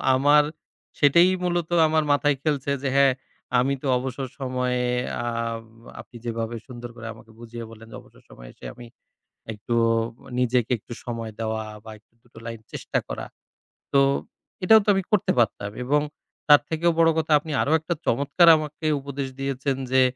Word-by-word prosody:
আমার 145 +3 +5 0.6
সেটাই 170 +5 +6
মূলত 175 -2 -1 0.2
আমার 155 0 +2
মাথায় 145 -1 +2
খেলছে 145 -3 -1
যে, 140 - 0
হ্যাঁ, 140 -1 +5 0.5
আমি 135 +3 +1
তো 140 - -4
অবসর 130 +1 -4
সময়ে, 125 -1 -1 0.4
আব 115 -1 -3 0.4
আপনি - - -20
যেভাবে 115 0 -3
সুন্দর 120 -1 -8
করে 115 -1 -8
আমাকে 110 0 -17
বুঝিয়ে 120 0 -8
বললেন 115 0 -13
যে - - -9
অবসর - - -21
সময়ে - - -13
এসে - - -14
আমি 120 0 -11 0.7
একটু 105 +3 -4 0.6
নিজেকে 125 -1 +1
একটু 120 - -13
সময় 115 -2 -5
দেওয়া 110 0 -2 0.2
বা, 110 - -9
একটু 105 - -38
দুটো 120 -2 -17
লাইন 115 -1 -6
চেষ্টা - - -2
করা, - - -5 0.7
তো, 140 - +5 0.6
এটাও 220 +3 +7
তো - - -13
আমি 195 - +1
করতে 210 - +3
পারতাম। 105 -3 +1
এবং 145 +4 +2 0.5
তার 145 -1 +8
থেকেও 165 +1 +2
বড় 165 0 +6
কথা, 160 0 0
আপনি 155 0 -7
আরো - - -1
একটা 170 +2 -2
চমৎকার 140 +7 +3
আমাকে 155 0 -5
উপদেশ 140 0 -5
দিয়েছেন, 135 0 -1 0.2
যে 130 0 +5
130 Hz, 165 wpm, -24 LUFS, 115-150 Hz, 0.7 s, তার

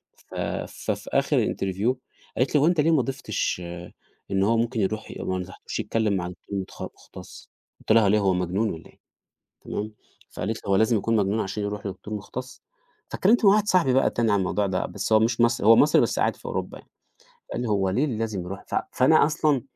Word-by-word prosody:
ف - - -15
ف - - -3
في - - -6
آخر - - +2
الinterview 95 +6 -1 0.4
قالِت 130 +4 +1
لي: 145 - +5
"هو 150 - +4
أنت 170 -3 +3
ليه 165 - +3
ما 155 -4 +4
ضيفتش 130 -7 -2
آآ، 85 0 -8 0.4
إن 95 0 +2
هو 115 +3 +3
ممكن 115 +1 0
يروح 110 +3 -2
ما 95 - -2
نصحتوش 90 +1 -7
يتكلّم 110 -2 0
مع 90 -2 -2
دكتور 100 +2 -6
متخ 95 - -8
مختص" - - -11 0.3
قلت - - -3
لها: 110 -3 +5
ليه 105 +2 +4
هو 95 -2 +2
مجنون 90 +5 0
والّا 80 - -9
إيه؟" - - -24 0.6
تمام 105 +1 -4 0.4
فقالِت 110 +2 -3
لى: - - -13
"هو 100 - +4
لازم 110 +3 +3
يكون 115 +3 0
مجنون 105 +1 +1
عشان 100 +1 -4
يروح 105 0 -4
لدكتور 100 +2 -7
مختص؟" 125 +5 -7 0.5
فاتكلمت 220 +4 +3
مع 195 - +8
واحد 210 0 +3
صاحبي 175 -10 +3
بقى 135 - +4
تاني 115 -3 0
عن 100 - +3
الموضوع 100 +2 0
ده، - - -1
بس - - -3
هو 110 - +7
مش 115 +1 +1
مصري 120 -2 +2
هو 115 - +9
مصري 150 +6 +5
بس - - 0
قاعد - - +1
في - - -21
أوروبا - - -4
يعني، - - -18 0.6
قال - - -2
لي 125 - -2
هو 100 -2 +1
ليه 125 +10 +1
لازم 110 -6 -3
يروح 95 +3 -7
ف - - -4 0.2
فأنا 135 +5 +5
أصلًا 150 -3 +1
110 Hz, 215 wpm, -25 LUFS, 95-130 Hz, 0.6 s, هو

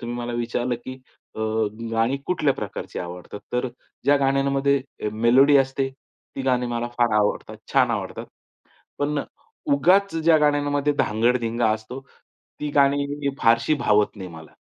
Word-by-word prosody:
तुम्ही 120 0 -5
मला 120 0 -4
विचारलं, 120 +1 -1
की 120 +2 -8 0.4
अ, - - -10 0.5
गाणी 115 +4 +1
कुठल्या 155 -6 +1
प्रकारची - - -6
आवडतात? 90 +3 -7
तर 125 +1 0 0.4
ज्या 145 +1 +5
गाण्यांमध्ये 135 -2 0
मेलोडी 130 +6 +5
असते 135 0 +1
ती 135 0 -12
गाणी 125 -2 +1
मला 120 0 -2
फार 120 -2 +3
आवडतात. 105 -1 0 0.2
छान - - +4
आवडतात. - - -4 0.7
पण 145 +1 0 0.5
उगाच 185 +8 +3
ज्या 165 0 +4
गाण्यांमध्ये 145 -1 +1
धांगड-धिंगा 115 0 +1
असतो, 110 +4 -4 0.6
ती 150 -1 -2
गाणी 140 0 +3 0.3
फारशी 115 +6 +3
भावत 105 +1 +2
नाही 95 -2 -7
मला. 80 -1 -12
125 Hz, 135 wpm, -23 LUFS, 115-140 Hz, 0.7 s, ज्या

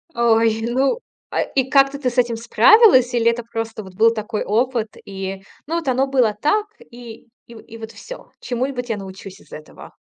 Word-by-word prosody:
Ой, 225 -1 +2
ну 265 - 0 0.3
а - - 0
и 265 -1 -2
как-то 275 0 +3
ты 255 - 0
с 245 - -11
этим 240 -2 +2
справилась, 250 - +5
или 235 -1 +3
это 235 0 -2
просто 225 -1 -6
вот 190 -1 -13
был 225 +4 +4
такой 215 -1 -4
опыт, 230 0 -1
и, 195 0 -6 0.2
ну, 330 - -2
вот 335 -4 -3
оно 260 +1 +1
было 255 -5 +2
так, 305 - 0 0.3
и 235 -2 -12 0.2
и 230 -1 -13
вот 220 0 -8
всё, - - -11
чему-нибудь 250 0 -3
я 225 - -1
научусь 195 0 -10
из - - -22
этого. 155 - -12
235 Hz, 185 wpm, -20 LUFS, 220-260 Hz, 0.3 s, справилась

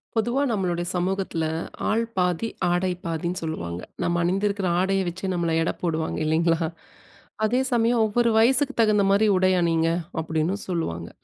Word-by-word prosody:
பொதுவா 240 +5 +1
நம்மளுடைய 180 -5 -1
சமூகத்துல, 185 -2 -1 0.5
ஆள் 225 +2 +2
பாதி, 180 +4 +1 0.2
ஆடை 175 +1 +1 0.2
பாதின்னு 170 +2 -2
சொல்லுவாங்க. 90 - -4 0.2
நம்ம 170 0 +1
அணிந்திருக்கிற 195 +2 0
ஆடைய 195 +1 +1
வச்சே, 185 +3 -4
நம்மள 170 -2 0
எடை 165 - 0
போடுவாங்க 160 -2 -1
இல்லேங்களா! 165 +1 +2 0.8
அதே 245 +4 +2
சமயம், 235 0 +3
ஒவ்வொரு 235 +2 +2
வயசுக்கு 265 +5 +3
தகுந்த 210 -2 +3
மாதிரி 205 +2 +4
உடை 185 0 +3
அணிங்க. 165 -1 +2 0.3
அப்பிடின்னு 160 +4 -1
சொல்லுவாங்க. 85 - -3
180 Hz, 140 wpm, -24 LUFS, 165-210 Hz, 0.8 s, மாதிரி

